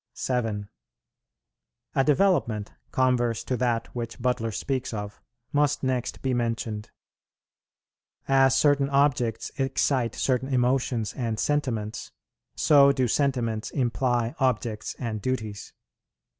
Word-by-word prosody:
7. 115 -6 -2 1.3
A 135 - +3
development, 145 - +2 0.2
converse 120 -3 +1
to 130 - -1
that 120 -2 0
which 115 -1 -5
Butler 125 -2 0
speaks 130 +2 -3
of, 105 0 -6 0.3
must 145 -1 +2
next 130 -2 -2
be 130 -1 +1
mentioned. 115 -3 -2 1.4
As 135 -1 +4
certain 140 -1 +3
objects 135 -5 +1
excite 135 -3 +1
certain 130 +1 0
emotions 125 -3 +1
and 115 -4 -3
sentiments, 115 -7 -1 0.4
so 140 -2 +6
do 130 -2 +1
sentiments 120 -4 0
imply 120 -2 0
objects 120 -5 -1
and 110 -4 -4
duties. 110 -4 -3
125 Hz, 105 wpm, -26 LUFS, 115-135 Hz, 1.4 s, so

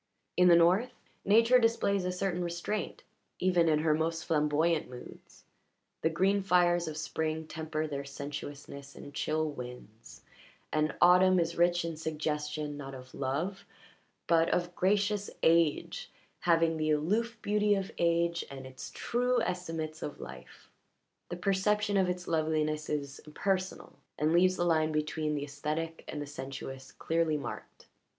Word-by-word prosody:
In 180 0 +5
the 175 - +8
North, 180 +8 +4 0.3
Nature 230 +5 +5
displays 215 -5 +1
a 180 - 0
certain 180 -1 -1
restraint 175 +5 -3 0.3
even 180 -3 +3
in 155 - +4
her 155 0 +2
most 160 +1 -1
flamboyant 155 +1 +1
moods: 125 -1 -12 0.6
the 160 - +2
green 195 +5 +2
fires 175 -2 +3
of 155 -1 -5
spring 155 0 -2
temper 155 0 -3
their 140 -2 -4
sensuousness 140 0 -8
in 145 - -10
chill 155 +2 -1
winds, 125 -4 -10 0.5
and 155 -1 +1
autumn 180 +1 +6
is 170 0 0
rich 175 0 +3
in 165 -2 -4
suggestion 150 -1 -3
not 135 -1 -7
of 130 0 -12
love, 160 +9 -2 0.6
but 165 -1 +3
of 175 0 0
gracious 205 +2 +1
age, 165 -2 +2 0.3
having 165 -1 +3
the 155 0 0
aloof 210 +11 +1
beauty 210 0 +3
of 195 -1 -3
age 170 0 +2
and 135 -1 -8
its 130 0 -8
true 250 +1 +1
estimates 165 -3 -4
of 145 - -6
life. - - -11 0.6
The 175 - -4
perception 205 +2 +1
of 190 -2 +3
its 180 0 -4
loveliness 155 -1 0
is 140 -2 -3
impersonal 185 +5 -3 0.2
and 155 +2 +1
leaves 185 +2 +4
the 175 - 0
line 160 -2 +2
between 150 0 -1
the 145 - -2
aesthetic 150 +3 -4
and - - -5
the 145 - -4
sensuous 135 -1 -7
clearly 165 -2 0
marked. 145 - -8
165 Hz, 145 wpm, -31 LUFS, 150-180 Hz, 0.6 s, the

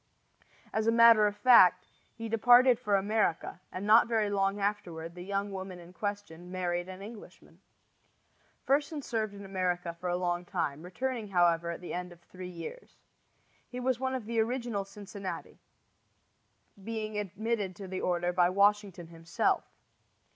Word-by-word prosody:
As 220 0 0
a - - +5
matter 230 -2 +7
of 205 - -3
fact, 205 -5 +6 0.3
he 230 0 -6
departed 245 +2 +5
for 205 -2 +1
America, 200 -4 0
and 185 +2 -5
not 220 +3 +6
very 220 -3 +1
long 195 0 0
afterward 180 -5 -3
the 180 - -10
young 200 +2 -2
woman 190 -1 -6
in 175 0 -13
question 200 -4 -5
married 175 -1 -2
an 185 +1 -9
Englishman. 215 +1 -13 1.0
Fersen 290 +2 0
served 215 -4 -2
in 200 0 -9
America 180 -3 -2
for 180 - -3
a 175 0 -1
time, 155 -6 -3
returning, 230 +6 -4
however, 170 -3 +2
at 170 - -5
the 180 - -7
end 180 0 -4
of 175 - -15
three 180 +1 -10
years. 180 - -9 0.7
He 250 - -6
was 250 -1 0
one 260 0 -1
of 250 -4 -5
the 230 +1 -1
original 230 -3 -1
Cincinnati, 200 -1 -8 1.2
being 215 -1 -4
admitted 205 0 -3
to 195 +2 -8
the 185 0 -4
order 175 0 0
by 175 0 +4
Washington 200 -2 +2
himself. 165 0 -1
200 Hz, 155 wpm, -30 LUFS, 180-220 Hz, 1.2 s, matter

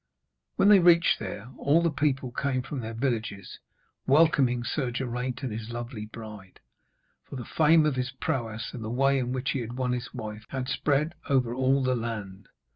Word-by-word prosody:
When 200 - +4
they 205 -2 +8
reached 170 -1 +5
there, 110 +4 -6
all 155 +4 +3
the 170 - +2
people 140 -3 0
came 130 0 -1
from 135 +1 -5
their 115 -1 -5
villages 115 -6 -3 0.5
welcoming 135 -4 +4
Sir 130 +1 -1
Geraint 125 +1 -3
and 130 - -2
his 110 +1 -6
lovely 120 -2 -6
bride, 105 -4 -11 0.7
for - - -7
the 125 -3 -6
fame 160 +3 +4
of 145 -4 0
his 125 0 -1
prowess, 115 -3 -3
and 120 - -6
the 110 - -4
way 135 +3 +2
in 125 -1 -2
which 130 +1 -1
he 135 - -1
had 120 -1 -5
won 125 -1 0
his 125 0 -3
wife, 110 -2 -7
had 130 -1 -3
spread 150 +3 +1 0.2
over 130 -4 +2
all 130 +2 +2
the 130 0 +2
land. 105 -5 -5
125 Hz, 190 wpm, -27 LUFS, 115-140 Hz, 0.7 s, they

